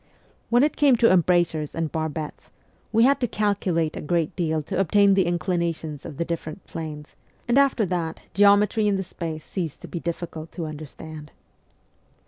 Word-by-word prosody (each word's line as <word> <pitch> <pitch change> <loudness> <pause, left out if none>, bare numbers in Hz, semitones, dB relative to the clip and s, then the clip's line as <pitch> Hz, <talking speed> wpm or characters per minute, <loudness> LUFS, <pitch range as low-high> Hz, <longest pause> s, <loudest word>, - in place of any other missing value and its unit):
When 240 +2 +4
it 300 - +1
came 285 -4 +5
to 230 0 +4
embrasures 175 -4 +2
and 165 -2 -2
barbettes, 160 -1 -4 0.4
we 225 +1 +4
had 275 +3 +4
to 245 - +1
calculate 190 -7 0
a - - -5
great 165 0 -1
deal 160 -3 0
to 185 +4 -3
obtain 200 +2 +4
the 190 -2 +3
inclina 175 0 0
tions 150 -3 -8
of 150 -4 -9
the 170 - -1
different 165 +1 -5
planes, 155 -2 -7 0.3
and 240 - +2
after 275 -5 +4
that 170 -3 -2
geometry 205 +2 +4
in 205 - +2
the 190 - -1
space 160 -3 -6
ceased 170 -6 -4
to - - -9
be 170 - -5
difficult 165 -1 -5
to 170 - -4
understand. 155 0 -9
170 Hz, 175 wpm, -24 LUFS, 160-200 Hz, 0.4 s, came